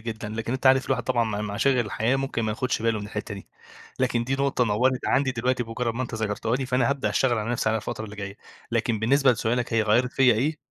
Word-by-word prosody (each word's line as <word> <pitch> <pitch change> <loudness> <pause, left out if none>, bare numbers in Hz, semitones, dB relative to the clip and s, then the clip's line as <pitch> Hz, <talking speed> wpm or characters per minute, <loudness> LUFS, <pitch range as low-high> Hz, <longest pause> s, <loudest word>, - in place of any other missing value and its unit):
جدًا، 110 -1 -5
لكن 115 +2 -4
أنت 130 +1 -1
عارف 130 0 +5
الواحد - - 0
طبعًا 120 -2 +1
مع 105 -2 -3
مع 105 -1 -4
مشاغل 130 +3 +2
الحياة 115 +5 0
ممكن 135 -3 -2
ما 110 - -1
ياخدش 120 +1 -2
باله 115 -1 +1
من 100 - -6
الحتة 105 -1 -5
دي، 100 - -11 0.5
لكن 120 -2 +1
دي 130 +3 -1
نقطة 135 -2 +1
نوَّرت 125 +4 +1
عندي 135 -1 +2
دلوقتي 125 +1 0
بمجرد 115 0 -3
ما 125 - -2
أنت 120 - -5
ذكرتها 110 +2 -1
لي، 135 0 -3
فأنا 125 -1 +1
هابدأ 140 -1 -1
أشتغل 120 -3 +2
على 110 +2 -3
نفسي، 120 -2 0
على 110 - +2
الفترة 110 +1 -5
اللي 105 -1 -10
جاية. 100 0 -6 0.3
لكن 115 -1 0
بالنسبة 135 +4 +4
لسؤالك، 120 +2 -1
هي 115 -1 +3
غيَّرِت 120 +4 +2
فيّا 130 -3 +4
إيه، 145 +8 0
120 Hz, 245 wpm, -25 LUFS, 110-130 Hz, 0.5 s, عارف